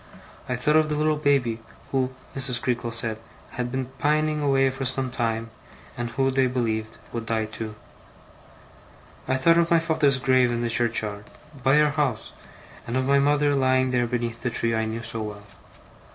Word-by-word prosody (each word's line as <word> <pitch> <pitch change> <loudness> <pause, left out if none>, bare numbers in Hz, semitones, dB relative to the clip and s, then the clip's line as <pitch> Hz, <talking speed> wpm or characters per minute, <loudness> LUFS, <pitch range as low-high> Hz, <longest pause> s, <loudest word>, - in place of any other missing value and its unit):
I 125 - 0
thought 150 +5 +2
of 155 -1 +3
the 150 - 0
little 155 +1 +2
baby, 140 -6 +1 0.3
who, 130 -1 +1 0.2
Mrs. 125 -2 -1
Creakle 120 -2 -1
said, 115 -1 -1 0.3
had 125 0 -3
been 130 0 -2
pining 150 +2 +1
away 135 -2 +3
for 135 +1 -5
some 130 0 -2
time, 115 -1 -2 0.4
and 120 -1 -3
who, 135 +2 +1
they 130 0 +2
believed, 110 -3 -2 0.2
would 115 -1 -4
die 110 -1 0
too. 110 0 -7 1.5
I 130 - +1
thought 165 +6 +4
of 170 0 +2
my 170 - +5
father's 160 -4 +2
grave 130 -1 +3
in 120 0 -1
the 120 -1 -1
churchyard, 110 -3 -1 0.4
by 135 +3 +5
our 150 -1 +4
house, 140 -7 -1 0.6
and 120 +2 -1
of 130 - 0
my 140 +1 +4
mother 145 +1 +3
lying 130 -1 +2
there 120 -1 +1
beneath 120 -1 -3
the 125 - -1
tree 115 0 0
I 110 0 0
knew 110 +1 -4
so 115 0 -3
well. 105 -1 -6
130 Hz, 180 wpm, -25 LUFS, 115-140 Hz, 1.5 s, my